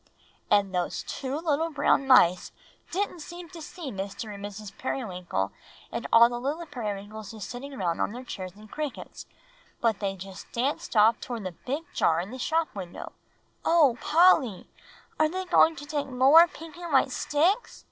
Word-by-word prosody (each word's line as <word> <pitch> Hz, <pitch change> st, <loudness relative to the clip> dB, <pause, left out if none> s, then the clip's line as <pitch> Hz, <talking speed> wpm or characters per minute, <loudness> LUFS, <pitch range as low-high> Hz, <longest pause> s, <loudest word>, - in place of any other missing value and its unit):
"And 200 Hz, -2 st, +3 dB
those 180 Hz, -1 st, -1 dB
two 270 Hz, +1 st, -4 dB
little 320 Hz, 0 st, 0 dB
brown 290 Hz, -2 st, +2 dB
mice 240 Hz, -9 st, +5 dB, 0.4 s
didn't 375 Hz, -1 st, -2 dB
seem 345 Hz, +2 st, -9 dB
to 335 Hz, -1 st, -10 dB
see 310 Hz, -2 st, -7 dB
Mr. 195 Hz, 0 st, -5 dB
Periwinkle 215 Hz, -, -7 dB
and 200 Hz, -1 st, -8 dB
Mrs. 205 Hz, 0 st, -8 dB
Periwinkle 180 Hz, -, -3 dB, 0.4 s
and 235 Hz, -, -4 dB
all 230 Hz, +1 st, +8 dB
the 240 Hz, 0 st, -4 dB
little 295 Hz, +7 st, -3 dB
Periwinkleses 215 Hz, -4 st, -6 dB
sitting 265 Hz, +5 st, -7 dB
round 170 Hz, -5 st, -1 dB
on -, -, 0 dB
their 245 Hz, +3 st, -7 dB
chairs 185 Hz, -6 st, -7 dB
and 215 Hz, 0 st, -15 dB
crickets, 300 Hz, -3 st, -6 dB, 0.5 s
but 225 Hz, -3 st, +1 dB
they 195 Hz, -2 st, -2 dB
just 190 Hz, 0 st, -10 dB
danced 255 Hz, +1 st, -2 dB
off 215 Hz, +1 st, +5 dB
towards 235 Hz, -4 st, -5 dB
the 185 Hz, -, -3 dB, 0.2 s
big 285 Hz, +5 st, -1 dB
jar 165 Hz, 0 st, +2 dB
in 185 Hz, +5 st, -5 dB
the 260 Hz, -, -7 dB
shop 320 Hz, +5 st, 0 dB
window." 185 Hz, -4 st, -7 dB, 0.5 s
"O 305 Hz, -8 st, +4 dB
Polly! 305 Hz, -, +4 dB, 0.5 s
are 310 Hz, 0 st, +4 dB
they 375 Hz, +3 st, -4 dB
going 325 Hz, -2 st, +5 dB
to 290 Hz, 0 st, -8 dB
take 290 Hz, -1 st, -2 dB
more 270 Hz, +6 st, +7 dB
pink 325 Hz, 0 st, -11 dB
and 345 Hz, -1 st, -7 dB
white -, -, +4 dB
sticks?" 355 Hz, +11 st, 0 dB
250 Hz, 175 wpm, -27 LUFS, 205-310 Hz, 0.5 s, all